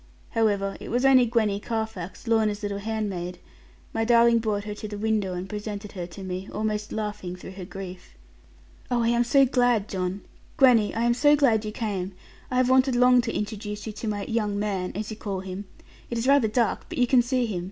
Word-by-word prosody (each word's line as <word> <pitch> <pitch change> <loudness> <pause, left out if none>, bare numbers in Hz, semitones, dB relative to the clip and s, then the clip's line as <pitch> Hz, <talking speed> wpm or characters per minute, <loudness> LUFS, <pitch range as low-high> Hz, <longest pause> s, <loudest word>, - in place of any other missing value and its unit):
However, 205 -3 +1
it - - -8
was 245 +3 +1
only 260 -2 +6
Gwenny 215 -4 +1
Carfax, 220 -5 -4
Lorna's 215 -2 +1
little 200 -1 -2
handmaid: 200 -5 -3 0.6
my 225 - 0
darling 235 0 +5
brought 210 -2 -1
her 210 0 -5
to 210 +1 -7
the 205 0 -6
window 210 -3 0
and 180 +1 -5
presented 210 0 -6
her 180 -3 -5
to 190 +3 -10
me, 185 +1 -5
almost 210 0 -2
laughing 210 -4 -4
through 180 - -10
her 190 -1 -8
grief. 185 -1 -9 0.7
'Oh, 240 -2 +1
I 230 - +2
am 235 0 +3
so 275 +3 +5
glad, 245 -5 +2
John; 185 0 -3 0.4
Gwenny, 240 -6 +5
I 230 - 0
am 240 0 +3
so 290 +5 +5
glad 230 -7 +3
you 210 - -3
came. 200 -4 -3 0.4
I 255 - -3
have 255 -1 +4
wanted 260 0 +4
long 250 0 +6
to 230 -1 -3
introduce 210 0 -4
you 220 - -5
to 220 - -6
my 205 -1 -2
"young 210 -3 -1
man," 200 -3 -2
as 215 +2 -4
you 215 - -6
call 195 -4 -4
him. 190 +1 -6 0.4
It 235 - -3
is 230 +3 -1
rather 275 -4 +5
dark, 225 0 0
but - - -6
you 245 - +4
can 245 0 +5
see 245 +1 0
him. 205 -6 -3
215 Hz, 215 wpm, -26 LUFS, 200-235 Hz, 0.7 s, only